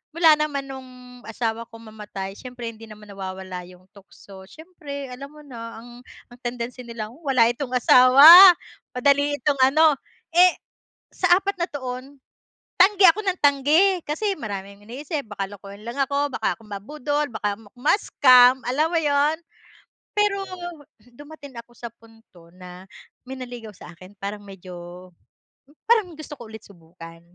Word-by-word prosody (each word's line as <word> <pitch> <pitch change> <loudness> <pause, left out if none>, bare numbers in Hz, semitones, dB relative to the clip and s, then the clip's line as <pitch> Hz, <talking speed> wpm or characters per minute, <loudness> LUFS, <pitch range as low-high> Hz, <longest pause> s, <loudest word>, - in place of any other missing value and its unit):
mula 325 -2 +5
naman 285 -2 -3
nung 265 -1 -10 0.4
asawa 225 0 -3
ko - - -13
mamatay 205 -3 -8
siyempre 245 -1 -9
hindi 225 0 -16
naman 210 -1 -14
nawawala 190 -2 -7
'yong 180 +1 -18
tukso, 195 -1 -16
siyempre 295 - -10
alam 275 +3 -9
mo 300 - -16
na 230 -4 -10
ang 245 - -14 0.4
ang 245 - -14
tendency 245 +1 -6
nila 225 -2 -6
"wala 260 -5 +1
itong 255 +1 -7
asawa, 255 +4 +6 0.7
madali 285 +3 +2
itong 290 -2 0
ano" 305 +2 +4 0.4
eh 360 0 +6 0.6
sa 360 -1 +3
4 400 0 -3
na 345 - -1
taon, 260 0 -7 0.6
tanggi 390 +1 +5
ako 350 +6 +3
nang 375 -1 -1
tanggi. 305 +7 +3
Kasi 400 +7 -1
maraming 200 -1 -8
iniisip, 285 +2 -6
baka 195 -1 -5
lokohin 200 +1 -12
lang 240 +3 -7
ako, 280 0 -1
baka 220 - -1
ako - - -20
mabudol, 290 +8 -3
baka 205 -2 -3 0.2
ma-scam, 255 - +4
alam 295 +6 0
mo - - 0
'yon. 295 +1 +1 0.8
Pero 405 -1 +1 0.7
dumating 290 -1 -13
ako 240 +1 -21
sa 235 -1 -8
punto 225 -7 -21
na 180 0 -12 0.4
may 265 - -7
nanligaw 245 -3 -9
sa 175 - -13
akin, 185 +4 -16
parang 205 +1 -6
medyo 180 -2 -12 0.8
parang 425 -8 +2
gusto 305 -1 -9
ko 230 - -10
ulit 220 0 -11
subukan. 165 -2 -15
250 Hz, 145 wpm, -22 LUFS, 205-290 Hz, 0.8 s, asawa